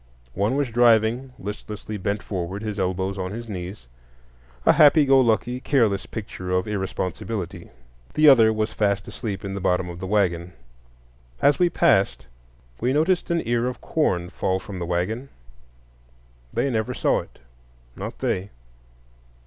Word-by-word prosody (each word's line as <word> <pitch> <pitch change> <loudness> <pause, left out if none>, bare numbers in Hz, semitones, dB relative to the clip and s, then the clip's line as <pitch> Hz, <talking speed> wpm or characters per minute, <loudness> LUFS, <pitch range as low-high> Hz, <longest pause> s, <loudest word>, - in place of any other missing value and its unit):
One 105 - 0
was 140 -4 0
driving, 120 +2 +3
listlessly 105 +1 -6
bent 100 +2 -2
forward, 95 +1 -4
his 105 -2 -4
elbows 95 +1 -1
on 95 0 -2
his 115 +2 -6
knees,—a - - -5
happy 150 0 +6
go 135 -1 +6
lucky, 120 +1 +1
careless 110 - +1
picture 95 -4 -7
of 90 +1 0
irresponsibility. 95 -2 -4 0.5
The 155 0 +5
other 115 -6 +7
was 110 0 -1
fast 100 -2 0
asleep 100 -4 -5
in 100 - -4
the 100 - -4
bottom 90 -1 +1
of 85 0 -8
the 95 - -5
wagon. 90 -4 0 0.9
As 140 0 +3
we 175 -1 +4
passed 130 - +2 0.5
we 125 +3 +1
noticed 165 +5 +1
an 170 -8 0
ear 120 +1 +1
of 125 - -4
corn 90 - 0
fall 95 -1 -1
from 95 0 -8
the 85 - -4
wagon. 105 +10 -2 1.2
They 140 - 0
never 110 -2 -1
saw - - +2
it,—not - - -12
they. 95 +2 -2
100 Hz, 145 wpm, -24 LUFS, 90-120 Hz, 1.2 s, other